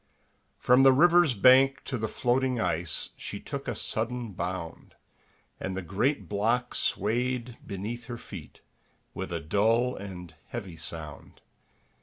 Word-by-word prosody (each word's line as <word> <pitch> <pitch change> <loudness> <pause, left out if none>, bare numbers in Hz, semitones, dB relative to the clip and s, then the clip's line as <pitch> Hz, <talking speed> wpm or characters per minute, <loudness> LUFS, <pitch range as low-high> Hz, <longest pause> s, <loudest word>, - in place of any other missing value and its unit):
From 125 +2 +5
the 135 0 +7
river's 170 -1 +5
bank 130 +5 +5
to 135 - -4
the 110 -2 -1
floating 125 +2 0
ice 85 -5 -1
She - - -6
took - - -6
a - - -2
sudden 115 0 -2
bound, 90 -2 -5 0.6
And 95 0 -4
the 95 - -3
great 110 - 0
block 115 +5 0
swayed 120 +2 -1
beneath 110 +4 -5
her 120 0 -6
feet 90 -9 -11 0.5
With - - -5
a 85 - -2
dull 115 +9 +2
and 90 -4 -8
heavy 95 - -7
sound. 80 -2 -8
115 Hz, 135 wpm, -28 LUFS, 95-125 Hz, 0.6 s, the